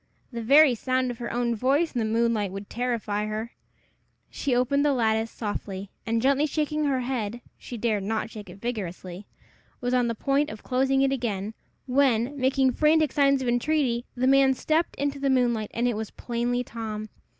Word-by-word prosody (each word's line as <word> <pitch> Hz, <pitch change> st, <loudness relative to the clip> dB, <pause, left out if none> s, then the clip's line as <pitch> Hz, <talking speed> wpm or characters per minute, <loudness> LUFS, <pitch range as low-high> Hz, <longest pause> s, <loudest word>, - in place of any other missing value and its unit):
The 235 Hz, -1 st, -5 dB
very 280 Hz, +4 st, +6 dB
sound 255 Hz, +2 st, 0 dB
of 240 Hz, -, -9 dB
her 235 Hz, -, -4 dB
own 240 Hz, 0 st, 0 dB
voice 275 Hz, +8 st, +1 dB
in 245 Hz, -, -1 dB
the 225 Hz, -, 0 dB
moonlight 225 Hz, -3 st, +1 dB
would 195 Hz, +1 st, -8 dB
terrify 225 Hz, -4 st, -2 dB
her. 215 Hz, +2 st, -4 dB, 0.8 s
She 270 Hz, -4 st, -1 dB
opened 265 Hz, +3 st, +2 dB
the 295 Hz, -1 st, +3 dB
lattice 225 Hz, -2 st, +1 dB
softly, 200 Hz, -3 st, -5 dB, 0.2 s
and 225 Hz, +1 st, 0 dB
gently 280 Hz, +3 st, +3 dB
shaking 305 Hz, 0 st, -1 dB
her 270 Hz, -3 st, +1 dB
head 240 Hz, -3 st, -3 dB, 0.2 s
she 245 Hz, -, -7 dB
dared 220 Hz, -2 st, 0 dB
not 220 Hz, +3 st, -2 dB
shake 210 Hz, -3 st, -9 dB
it 185 Hz, +3 st, -12 dB
vigorously 195 Hz, -4 st, -5 dB, 0.5 s
was 245 Hz, 0 st, -2 dB
on 250 Hz, -1 st, +3 dB
the 230 Hz, -, -2 dB
point 280 Hz, +5 st, +1 dB
of 215 Hz, -, -9 dB
closing 270 Hz, +1 st, +2 dB
it 270 Hz, -, +2 dB
again, 220 Hz, -5 st, -2 dB, 0.3 s
when, 260 Hz, -1 st, +2 dB
making 265 Hz, -1 st, +2 dB
frantic 305 Hz, +1 st, +3 dB
signs 275 Hz, -2 st, +3 dB
of -, -, -3 dB
entreaty, 245 Hz, 0 st, +1 dB
the 250 Hz, +1 st, 0 dB
man 270 Hz, 0 st, +5 dB
stepped 315 Hz, +5 st, 0 dB
into 285 Hz, 0 st, -2 dB
the 275 Hz, 0 st, 0 dB
moonlight, 240 Hz, -5 st, +1 dB
and 235 Hz, +2 st, 0 dB
it 240 Hz, -, 0 dB
was 220 Hz, 0 st, -4 dB
plainly 240 Hz, +1 st, -2 dB
Tom. 215 Hz, -2 st, -6 dB
245 Hz, 185 wpm, -26 LUFS, 220-270 Hz, 0.8 s, very